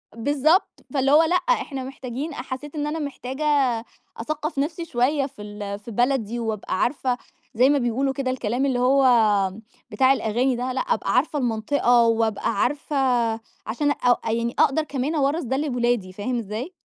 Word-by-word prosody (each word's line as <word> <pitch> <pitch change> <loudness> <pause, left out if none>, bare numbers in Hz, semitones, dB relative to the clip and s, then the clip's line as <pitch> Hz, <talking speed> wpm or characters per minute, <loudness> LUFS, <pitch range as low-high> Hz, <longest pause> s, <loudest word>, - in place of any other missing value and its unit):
بالضبط. 290 +8 +1
فاللي 270 -1 +2
هو 305 +3 +7
لأ، 345 +3 +1
إحنا 355 - 0
محتاجين 265 +3 -6
أ 245 - -5
حسّيت 265 +4 -7
إن 295 -1 -2
أنا 320 +2 -3
محتاجة 280 0 -5 0.7
أثقّف 305 +4 -3
نفْسي 325 +4 -2
شوية 275 +1 +1
في 265 -5 -10
ال 205 -1 -6
في 220 +3 -10
بلدي، 240 0 0
وأبقى 215 -4 -3
عارفة 255 -2 0 0.4
زي 250 +4 +4
ما 285 - +4
بيقولوا 265 +2 0
كده 270 -2 -2
الكلام 250 +1 -1
اللي 260 -3 0
هو 265 +2 +4 0.9
بتاع 260 +5 +4
الأغاني 250 +2 0
ده، 250 +2 -2
لأ 260 - -1
أبقى - - -1
عارفة 290 +3 +1
المنطقة، 240 +1 +2
وأبقى 225 -2 +1
عارفة 290 +2 -1 0.7
عشان 285 +6 0
أ 245 -3 +2
يعني 230 +1 -1
أقدَر 295 +3 +3
كمان 285 +1 -2
أورّث 295 +3 +1
ده 265 +1 -1
لولادي، 240 -9 0
فاهم 240 +6 -3
إزاي؟ 230 - -5
260 Hz, 165 wpm, -23 LUFS, 235-285 Hz, 0.9 s, هو